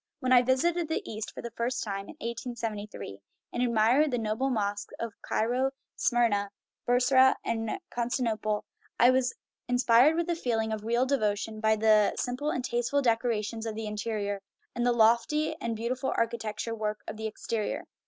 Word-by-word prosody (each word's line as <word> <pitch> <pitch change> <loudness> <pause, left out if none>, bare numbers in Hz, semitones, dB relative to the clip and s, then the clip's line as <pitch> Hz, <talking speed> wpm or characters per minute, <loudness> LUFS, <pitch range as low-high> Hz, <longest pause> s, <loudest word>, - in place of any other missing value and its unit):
When 255 -2 +2
I 250 - +8
visited 320 +7 +1
the 320 - -3
East 215 0 -5
for - - -9
the 235 - -5
first 235 +3 -2
time, 195 -2 -4
in - - -11
1873, 220 - -5 0.3
and 240 - -1
admired 240 +5 +3
the 250 - 0
noble 225 +4 -1
mosques 205 -4 -2
of 230 -2 -4
Cairo, 250 +4 0 0.3
Smyrna, 225 -5 +2 0.4
Brussa, 255 +2 +5
and 225 - -1
Constantinople, 225 -3 -1 0.3
I 245 +2 +7
was 255 -1 +1 0.3
inspired 245 +4 +5
with 340 0 0
a - - +1
feel 245 -8 -1
ing 220 0 -1
of 215 -1 -5
real 235 +3 +2
devotion 215 -5 -1
by 220 0 +3
the 215 -1 +4
simple 255 +4 -2
and 255 -4 -2
tasteful 240 +4 0
decora 230 -2 +1
tion 225 +2 -5
of 220 - -4
the 220 0 -4
interior, 210 -1 -3 0.3
and 240 - -2
the - - +4
lofty 240 +7 +3
and 230 -1 -2
beautiful 245 +4 -2
archi 230 0 0
tectural 220 +1 -4
work 210 0 -2
of 215 - -6
the 220 0 -3
exterior. 220 0 -3
230 Hz, 175 wpm, -29 LUFS, 215-250 Hz, 0.4 s, I